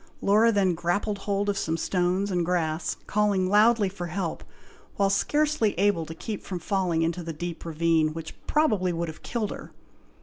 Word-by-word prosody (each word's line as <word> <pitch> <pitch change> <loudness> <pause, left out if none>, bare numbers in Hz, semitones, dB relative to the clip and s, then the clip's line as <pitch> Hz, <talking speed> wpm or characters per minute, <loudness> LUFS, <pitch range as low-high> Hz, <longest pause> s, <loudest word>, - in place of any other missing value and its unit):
Laura 215 +3 +4
then 195 -4 +2
grappled 195 +5 -1
hold 200 0 -1
of 200 -1 0
some 165 0 -1
stones 185 +3 0
and 175 -2 +1
grass, 165 -2 -1
calling 205 -3 +1
loudly 210 +2 +4
for 180 -2 -5
help, 170 -1 -3 0.5
while 195 -1 +2
scarcely 295 - +1
able 190 -4 +2
to 160 - -7
keep 210 +4 -5
from 185 - -5
falling 175 -2 0
into 170 +2 -1
the 165 -1 -5
deep 170 +2 -6
ravine, 165 -1 +1
which 160 0 -7
would - - -23
probably 215 - +2
have 160 -1 -9
killed 220 -4 -3
her. - - -8
185 Hz, 175 wpm, -26 LUFS, 170-205 Hz, 0.5 s, Laura